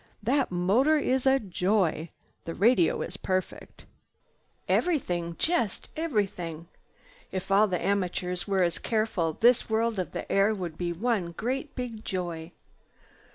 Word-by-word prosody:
That 265 +4 +2
motor 205 - +3
is 265 -2 +1
a 265 0 +6
joy! 185 - 0 0.4
The 165 - -5
radio 200 -5 +3
is 200 - -7
perfect. 185 -1 -4 0.8
Everything, 175 - 0
just 320 - 0
everything. 195 - -2 0.6
If 185 +1 -4
all 205 +2 +5
the 180 -3 -1
amateurs 180 -2 -1
were 195 -2 +2
as 170 -1 0
careful 215 -8 0
this 235 +7 +3
world 220 -1 +1
of 185 - -3
the - - -5
air 200 +2 +3
would 175 -5 -5
be 175 +1 -2
one 190 -2 -1
great 260 - -3
big 235 -4 -5
joy." 175 -3 -4
195 Hz, 135 wpm, -28 LUFS, 175-235 Hz, 0.8 s, a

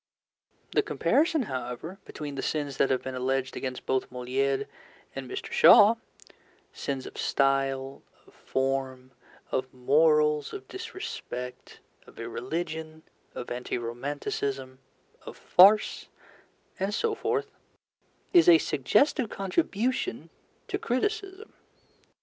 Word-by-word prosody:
The - - +3
comparison, 315 -1 +1
however, 130 - -5
between 145 -2 -7
the 135 - -4
sins 145 -3 -2
that 135 - +3
have 130 - 0
been 130 - -5
alleged 130 +1 -1
against 130 -1 -5
both 130 0 0
Molière 130 +2 -1 0.5
and 135 -2 -6
Mr. - - -6
Shaw 210 +2 +8 0.8
sins 135 -2 -4
of - - -9
style, 135 -1 0 0.2
of - - -21
form, 130 -1 -2 0.4
of 130 0 -2
morals, 150 +3 +3
of 400 - -8
disrespect, 355 - -7 0.3
of - - -15
irreligion, 155 +6 -5 0.3
of 120 - -6
anti 125 +1 -3
romanticism, 130 +2 -4 0.4
of - - -10
farce, 205 +4 +5 0.7
and 195 +2 -1
so 455 - 0
forth 435 -1 -2 0.8
is 350 0 +7
a 340 - +9
suggestive 285 -7 +1
contribution 220 - -1 0.4
to - - -2
criticism. 400 - -2
140 Hz, 110 wpm, -28 LUFS, 130-210 Hz, 0.8 s, a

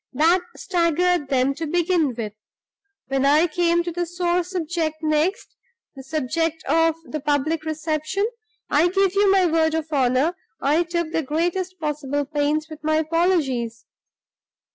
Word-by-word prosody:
That 330 +7 +3 0.2
staggered 350 -3 +1
them 265 0 +2
to 320 +3 -5
begin 340 -4 +1
with. 215 -3 -5 0.8
When 270 0 0
I 295 +4 +5
came 345 +1 +1
to 345 - -4
the 350 +1 -2
sore 350 +1 0
subject 335 -3 -2
next 310 +6 0 0.4
the 270 - -9
subject 320 +3 -2
of 325 +2 +3
the 310 - -5
public 300 +2 0
reception 315 +5 -1 0.4
I 315 +4 +3
give 385 +1 +2
you 400 0 +4
my 385 -2 +4
word 320 -1 +2
of 320 -1 -1
honor 265 +5 +2 0.2
I 295 +5 +2
took 340 -1 -2
the 325 - 0
greatest 350 +5 -2
possible 290 -2 -2
pains 295 +1 0
with 310 -1 -11
my 310 0 +1
apologies. 310 -8 0
320 Hz, 145 wpm, -23 LUFS, 295-345 Hz, 0.8 s, I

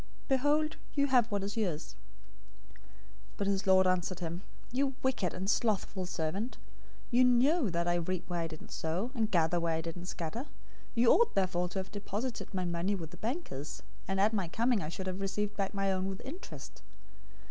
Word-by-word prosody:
Behold, 295 +3 +2 0.2
you 280 -1 +4
have 250 -4 +4
what 200 -1 0
is 200 +1 -3
yours.' 180 -8 -2 1.4
025:026 - - -22
"But 200 - 0
his 195 0 0
lord 190 0 +7
answered 185 0 +1
him, 170 0 -3 0.3
'You 270 +1 +1
wicked 235 -10 +1
and 190 +1 -4
slothful 200 -4 +1
servant. 185 +8 -2 0.5
You 245 +1 +6
knew 255 - +4
that 170 0 0
I 175 - +3
reap 180 +1 -2
where 175 -1 -1
I 165 - 0
didn't 155 -1 -10
sow, 180 +10 -1
and 225 -5 +1
gather 170 -3 +3
where 165 -1 +1
I 160 - -1
didn't 170 +2 -6
scatter. 180 - -3
025:027 - - -19 0.5
You 230 0 +6
ought 470 - +4
therefore 180 -2 +1
to 190 - -5
have 190 0 -3
deposited 210 +4 -4
my 185 -3 -1
money 175 +3 0
with 165 -4 -6
the 180 - -10
bankers, 175 - -4 0.2
and 195 0 0
at 210 +3 +4
my 195 -5 0
coming 230 +4 +2
I 155 - -3
should 185 +3 -5
have 185 +1 -3
received 205 +1 -1
back 195 -1 -1
my 195 0 +2
own 190 0 0
with 195 -1 -4
interest. 315 +9 -8
195 Hz, 195 wpm, -32 LUFS, 175-235 Hz, 1.4 s, lord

